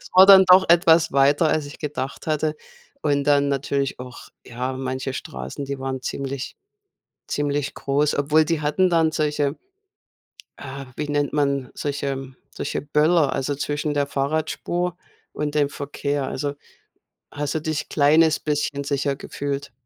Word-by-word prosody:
Es - - -14
war 185 +1 +9
dann 195 -1 +9
doch 185 0 +6
etwas 165 -1 +5
weiter, 140 +3 +4
als 155 -1 0
ich 145 - -11
gedacht 145 -3 -5
hatte. 155 0 0 0.5
Und 140 -1 +1
dann 145 -1 +3
natürlich 140 0 -1
auch, 125 0 -10 0.2
ja, 125 +2 -4
manche 130 0 -3
Straßen, 65 - -6
die 140 0 -5
waren 130 -1 -4
ziemlich 140 +1 -4 0.7
ziemlich 145 -1 -1
groß. 145 +2 0
Obwohl, 150 +2 +3
die 160 0 -1
hatten 165 +5 +2
dann 165 -2 +3
solche 150 -2 0 1.0
äh, 135 0 -8
wie 150 - -3
nennt 145 -1 0
man 140 -3 0
solche 140 -2 -3 0.2
solche - - -4
Böller, 150 +2 +2
also, 145 +2 -1
zwischen 145 +1 -2
der 145 -1 0
Fahrradspur 155 +5 -2 0.4
und 150 0 -3
dem 145 -2 +2
Verkehr. 140 0 -3
Also, 140 +2 -3 0.8
hast 145 +1 -3
du 155 - -1
dich 155 -1 -3
kleines 155 +2 +3
bisschen 145 -1 -1
sicher 140 0 -1
gefühlt. 140 0 -5
145 Hz, 150 wpm, -23 LUFS, 140-155 Hz, 1.0 s, war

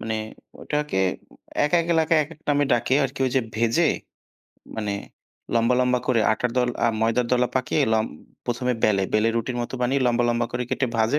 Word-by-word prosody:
মানে, 110 0 -3 0.5
ওটাকে 150 -5 -2 0.7
১-১ 165 +3 +2
এলাকায় 160 0 +3
একেক 155 +1 -14
নামে 145 0 +3
ডাকে 120 +2 +2
আরকি। 135 +1 -5
ওই - - -1
যে - - +5
ভেজে 115 +9 +2 0.9
মানে 105 -2 -2 0.6
লম্বা, 115 +2 +3
লম্বা 125 0 +2
করে 120 -3 +2
আটার 125 +2 -1
দল 125 -1 +2 0.2
আ - - +5
ময়দার 115 +2 +1
দলা 125 0 +3
পাকিয়ে 130 +3 0
লম্ব 110 0 +1 0.4
প্রথমে 125 +1 0
বেলে, 100 -2 +3
বেলে 110 +1 +3
রুটির 120 +2 -2
মতো 120 - -6
বানিয়ে 135 +3 +1
লম্বা, 120 0 +2
লম্বা 120 0 +1
করে 125 - -1
কেটে 130 - 0
ভাজে 115 +6 +2
125 Hz, 175 wpm, -24 LUFS, 115-135 Hz, 0.9 s, যে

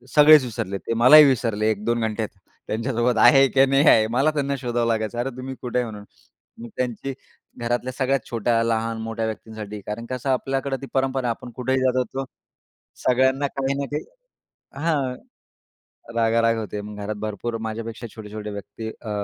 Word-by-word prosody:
सगळेच 150 -1 +8
विसरले 100 -5 -4
ते, 115 - -4
मलाही 130 +7 +8
विसरले 115 -5 +1
1-2 110 +3 -1
घंटे 110 0 -1
त्यांच्यासोबत 115 +5 -3
आहे 135 -2 +7
की 135 +1 +5
नाही 135 +3 +3
आहे. 110 -5 +6
मला 135 +6 +2
त्यांना 140 -2 -1
शोधावं 120 -2 0
लागायचं. 110 -1 -1
अरे 125 +2 -1
तुम्ही 130 +1 -6
कुठे 125 -1 -3
आहे 125 - 0
म्हणून? 105 -1 -9 0.6
मी 120 - -8
त्यांची 125 +2 -3 0.5
घरातल्या 120 +2 -2
सगळ्यात 135 +1 +1
छोट्या-लहान-मोठ्या 115 -1 0
व्यक्तींसाठी 110 -1 -6
कारण 105 +3 -5
कसं 130 +1 -3
आपल्याकडे 135 +1 -1
ती 135 - -7
परंपरा. 135 -1 0
आपण 120 +1 -5
कुठेही 130 +1 0
जात 130 -1 +2
होतो 130 +2 -2 0.8
सगळ्यांना 130 +2 +3
काही 135 0 -2
ना 140 - -1
काही 150 - -2 0.8
हां, 140 -6 0 1.0
रागाराग 115 0 +2
होते. 105 -1 -5
मग 105 0 -9
घरात 105 +1 -3
भरपूर 110 +2 -4
माझ्यापेक्षा 115 +1 -6
छोटे-छोटे 105 -1 -7
व्यक्ती 100 +2 -7
अ, 110 - -7
120 Hz, 155 wpm, -23 LUFS, 110-135 Hz, 1.0 s, सगळेच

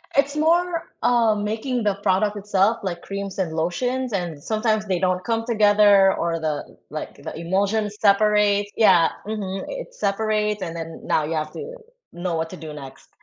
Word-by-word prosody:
It's 280 +1 +2
more, 335 +2 +1
um, 225 -4 +3
making 225 +3 -2
the 205 -2 +1
product 205 +1 +1
itself, 205 +2 +2
like, 175 -3 -3
creams 195 -1 -6
and 175 -4 -1
lotions, 245 +10 -1
and 170 -6 -3
sometimes 215 -1 0
they 185 -3 0
don't 185 0 0
come 225 +1 -1
together 205 -3 +5
or 170 -1 -1
the 155 -2 -4
like, - - -6
the - - -6
emulsions 200 +5 0
separates 205 0 +3
yeah, 180 -7 +5 0.2
mhm, 200 -3 -4
it - - -7
separates, 210 - 0
and 170 -2 -4
then 165 -1 -7
now 155 - +1
you 155 +2 -3
have 155 -1 -2
to 485 +3 -7 0.4
know 175 0 -3
what 160 0 -2
to 185 - -8
do 155 -2 -8
next, 135 -3 -11
200 Hz, 170 wpm, -23 LUFS, 175-220 Hz, 0.4 s, together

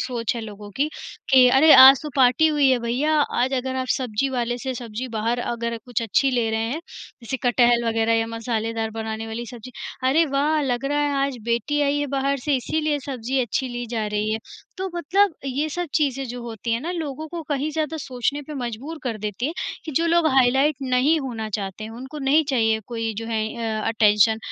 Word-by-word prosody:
सोच 240 -2 -2
है - - -3
लोगों 205 -1 -9
की, 285 +3 +1 0.4
कि 260 -2 +7
अरे, 275 +5 +6
आज 265 0 +9
तो 300 - -5
पार्टी 255 +3 +5
हुई 295 -3 +3
है 255 - +3
भईया 255 +7 0 0.2
आज 255 +2 +1
अगर 260 0 -2
आप 260 0 -2
सब्जी 250 0 -1
वाले 245 -2 -2
से 260 +1 -4
सब्जी 235 +1 -6
बाहर 230 +1 -1
अगर 235 -1 -3
कुछ 245 -3 -2
अच्छी 250 +5 +2
ले 240 -3 +1
रहे 220 0 -1
हैं, 305 +5 -3 0.4
जैसे 235 +3 -3
कटहल 240 -1 +3
वग़ैरह 225 0 +1
या 225 0 +1
मसालेदार 225 -1 -3
बनाने 220 0 -5
वाली 225 +2 -5
सब्ज़ी, 240 0 -10 0.4
अरे 310 +6 +4
वाह! 295 +2 +1
लग 255 -1 -1
रहा 290 +1 0
है 290 -1 +1
आज 275 -2 -3
बेटी 235 +6 0
आई 285 0 +1
है 290 - -1
बाहर 275 +1 -1
से 285 +3 0
इसलिए 305 +3 -1
सब्ज़ी 260 -1 -2
अच्छी 255 +2 -1
ली 240 0 -4
जा 220 -3 -1
रही 210 +1 -1
है। 220 - -1 0.4
तो 380 0 -2
मतलब 365 +3 +2
ये 275 +4 -1
सब 350 +3 -3
चीज़ें 275 -3 +1
जो 245 +1 -6
होती 230 -1 -4
है 230 - 0
ना 325 +6 -4
लोगों 315 -3 -4
को 340 +1 -6
कहीं 290 +1 -1
ज़्यादा 310 0 -2
सोचने 270 +2 -2
पे 300 +2 -9
मजबूर 260 +5 -5
कर 235 -5 -3
देती 210 +3 -3
है, 310 - -2 0.3
कि 315 - -6
जो 330 +5 +1
लोग 335 -1 +3
हाइलाइट 265 +3 +4
नहीं 265 +5 +2
होना 230 -5 -4
चाहते 195 0 -4
हैं, 220 - -7
उनको 260 +6 -8
नहीं 290 +3 +3
चाहिए 225 -4 +2
कोई 225 -2 -3
जो 225 - -5
है 225 -1 -1 0.4
अ, - - -4
अटेंशन, 220 0 +4
250 Hz, 215 wpm, -23 LUFS, 230-285 Hz, 0.4 s, आज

